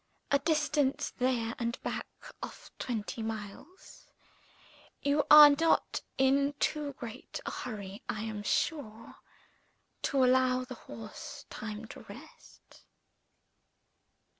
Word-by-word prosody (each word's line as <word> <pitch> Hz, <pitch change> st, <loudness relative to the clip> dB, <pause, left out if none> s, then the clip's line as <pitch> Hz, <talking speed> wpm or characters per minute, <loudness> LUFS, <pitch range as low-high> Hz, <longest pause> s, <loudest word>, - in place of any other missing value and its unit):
A 280 Hz, -, +5 dB
distance, 300 Hz, -2 st, +1 dB
there 245 Hz, -3 st, +1 dB
and 235 Hz, 0 st, -2 dB
back, -, -, -3 dB, 0.3 s
of -, -, -8 dB
twenty 225 Hz, -1 st, -3 dB
miles. 220 Hz, -, -8 dB, 1.0 s
You 285 Hz, 0 st, +2 dB
are 300 Hz, -1 st, +11 dB
not 325 Hz, +3 st, +2 dB, 0.2 s
in 275 Hz, +2 st, +3 dB
too 295 Hz, -2 st, 0 dB
great 235 Hz, -4 st, -8 dB
a -, -, -3 dB
hurry, 200 Hz, -4 st, -6 dB
I 215 Hz, -, -2 dB
am 215 Hz, -2 st, -4 dB
sure, 225 Hz, -, -2 dB, 0.8 s
to 270 Hz, -2 st, +3 dB
allow 255 Hz, 0 st, +3 dB
the 255 Hz, -, -7 dB
horse 115 Hz, -, -9 dB
time 215 Hz, 0 st, -6 dB
to -, -, -9 dB
rest?" -, -, -14 dB
255 Hz, 110 wpm, -31 LUFS, 220-285 Hz, 1.0 s, are